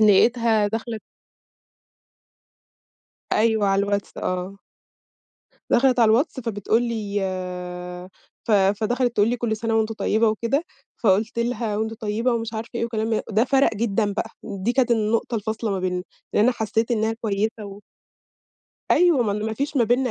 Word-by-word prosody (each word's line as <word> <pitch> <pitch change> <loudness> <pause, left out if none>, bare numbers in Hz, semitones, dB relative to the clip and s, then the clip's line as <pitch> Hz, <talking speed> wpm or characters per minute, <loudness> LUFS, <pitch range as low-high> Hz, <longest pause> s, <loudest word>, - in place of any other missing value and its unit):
لقيتها 220 +1 +4
دخلِت 225 0 -4 2.3
أيوه، 220 -1 +3
على 195 0 +2
الواتس 200 0 -2
آه. 185 +2 -3 1.1
دخلِت 255 0 +4
على 225 - +6
الواتس 260 +4 +1
فبتقول 225 0 0
لي 215 -4 -2
آآ، 180 -1 -5 0.4
ف - - -2
فدخلِت 215 +5 +2
تقول 205 +2 +4
لي: 245 - 0
"كُلّ 230 -2 -1
سنة 225 +1 -1
وأنتِ 220 0 +1
طيبة" 220 +1 +1
وكده، 235 +8 0 0.3
فقُلت 215 +3 +1
لِها: 235 -2 -1
"وأنتِ 220 +1 -2
طيبة"، 225 +2 -1
ومش 230 -1 -2
عارفة 220 +1 -5
إيه 235 - -1
وكلام 220 -1 -2
من 220 - +1
ده 220 +2 +3
فَرَق 270 -2 +3
جدًا 210 -1 0
بقى، 200 - -3
دي 200 +2 -2
كانت 255 -1 +2
النقطة 230 +1 +1
الفاصلة 220 0 -2
ما 195 - -1
بيننا 180 -1 -1 0.3
لأنّي 225 +5 +4
حسّيت 225 0 -1
إنّها 220 -1 +1
كويّسة 215 0 -1
و 200 0 -9 1.1
أيوه، 345 -8 +5
م - - -2 0.2
ما 220 - -2
فيش 280 +5 -3
ما 240 - +4
بيننا 245 +3 +1
220 Hz, 150 wpm, -23 LUFS, 205-235 Hz, 2.3 s, على